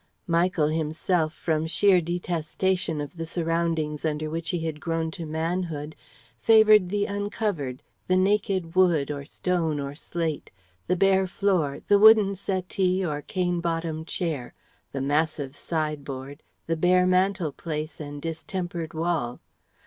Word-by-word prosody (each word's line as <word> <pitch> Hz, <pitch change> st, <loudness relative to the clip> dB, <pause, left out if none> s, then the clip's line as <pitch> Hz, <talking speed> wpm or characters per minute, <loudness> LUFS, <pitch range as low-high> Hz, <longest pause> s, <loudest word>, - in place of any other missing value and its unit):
Michael 170 Hz, -2 st, +2 dB
himself 160 Hz, +1 st, 0 dB
from 160 Hz, -1 st, -1 dB
sheer 185 Hz, +2 st, +4 dB
detestation 175 Hz, 0 st, -1 dB
of 145 Hz, +4 st, -6 dB
the 165 Hz, -, -3 dB
surroundings 165 Hz, -3 st, -1 dB
under 155 Hz, -1 st, -2 dB
which 165 Hz, +1 st, -3 dB
he 175 Hz, -2 st, -1 dB
had 155 Hz, -2 st, -3 dB
grown 165 Hz, -1 st, -1 dB
to 165 Hz, -2 st, -6 dB
manhood 160 Hz, -1 st, -3 dB, 0.4 s
favoured 215 Hz, -, +6 dB
the 205 Hz, +1 st, 0 dB
uncovered, 200 Hz, -, -3 dB, 0.2 s
the 185 Hz, -, +3 dB
naked 190 Hz, -3 st, +1 dB
wood 175 Hz, -6 st, +3 dB
or 140 Hz, -1 st, -5 dB
stone 165 Hz, -2 st, -1 dB
or 140 Hz, 0 st, -4 dB
slate, 160 Hz, 0 st, -3 dB, 0.4 s
the 180 Hz, -, +2 dB
bare 190 Hz, 0 st, +3 dB
floor, 180 Hz, -7 st, 0 dB
the 205 Hz, -, +5 dB
wooden 215 Hz, -2 st, +7 dB
settee 185 Hz, -1 st, -1 dB
or 150 Hz, -3 st, -2 dB
cane 175 Hz, +1 st, -1 dB
bottomed 165 Hz, -1 st, -2 dB
chair, 155 Hz, -10 st, -3 dB, 0.4 s
the 135 Hz, -, -3 dB
massive 145 Hz, -1 st, 0 dB
side 155 Hz, -2 st, -2 dB
board, 135 Hz, +1 st, -7 dB, 0.2 s
the 165 Hz, -, 0 dB
bare 180 Hz, +2 st, +4 dB
mantelpiece 170 Hz, -4 st, 0 dB
and 145 Hz, -1 st, -7 dB
distempered 165 Hz, 0 st, -4 dB
wall. 160 Hz, -7 st, -1 dB
165 Hz, 135 wpm, -26 LUFS, 155-185 Hz, 0.4 s, wooden